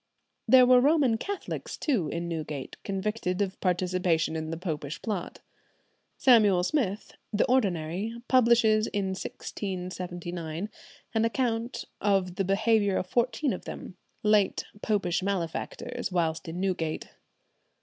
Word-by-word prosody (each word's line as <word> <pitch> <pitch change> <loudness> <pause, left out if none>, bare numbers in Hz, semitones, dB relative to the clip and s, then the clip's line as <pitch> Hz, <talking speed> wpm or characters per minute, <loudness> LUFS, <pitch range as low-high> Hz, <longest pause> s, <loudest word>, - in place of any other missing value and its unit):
There 255 -1 +8
were 250 0 +6
Roman 275 -5 +3
Catholics 400 +5 -5
too 225 - 0
in 170 +2 -3
Newgate, 155 -5 -5
convicted 195 -1 -2
of 195 -2 -1
participation 180 -3 +1
in 160 0 -3
the 165 - -3
Popish 155 -4 -4
Plot. 205 -6 -4 0.8
Samuel 210 -8 +5
Smith, 210 -3 -1 0.2
the 205 - +2
ordinary, 200 -4 0
publishes 235 -4 +4
in 200 -2 -1
1679 180 -2 -5 0.4
an 225 -1 +2
account 230 0 -1 0.2
of 195 -3 +2
the 195 - +2
behaviour 205 +1 +2
of - - -1
fourteen 250 +6 +1
of 185 - -7
them, - - -7 0.3
"late 210 -2 +3 0.2
Popish 195 -5 0
malefactors, 185 -1 -3
whilst 170 -1 0
in 165 +2 -5
Newgate." 180 -5 -2
195 Hz, 120 wpm, -28 LUFS, 175-225 Hz, 0.8 s, There